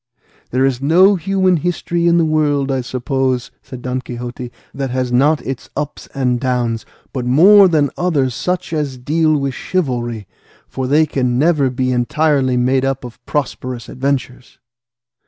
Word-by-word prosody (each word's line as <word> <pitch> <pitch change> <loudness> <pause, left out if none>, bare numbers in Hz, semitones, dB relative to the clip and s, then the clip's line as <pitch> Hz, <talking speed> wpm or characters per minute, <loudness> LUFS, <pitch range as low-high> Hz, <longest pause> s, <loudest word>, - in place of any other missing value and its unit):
"There 130 +2 +1
is 130 -2 -1
no 180 +8 +5
human 185 0 +1
history 170 +1 -1
in 170 0 +4
the 165 - +3
world, 145 -3 +1
I 135 -1 0
suppose," 130 0 -2
said 125 -1 -10
Don 125 0 -2
Quixote, 120 0 -7 0.2
"that 135 0 -3
has 130 0 -2
not 145 +5 +2
its 135 -1 -5
ups 145 +1 -5
and 125 -3 0
downs, 120 -3 -1 0.3
but 130 - -3
more 190 +11 +6
than 150 -5 +1
others 145 -8 0
such 180 +6 -3
as 145 -4 -2
deal 155 +4 +1
with 140 -1 -2
chivalry, 120 - -2 0.4
for 130 -1 -4
they 150 +4 +4
can 125 -4 -1
never 150 -2 +2
be 130 0 -1
entirely 130 +1 +1
made 130 +2 +2
up 135 0 -1
of 120 -2 -11
prosperous 130 -4 -3
adventures." 130 -2 -3
135 Hz, 155 wpm, -17 LUFS, 125-155 Hz, 0.4 s, more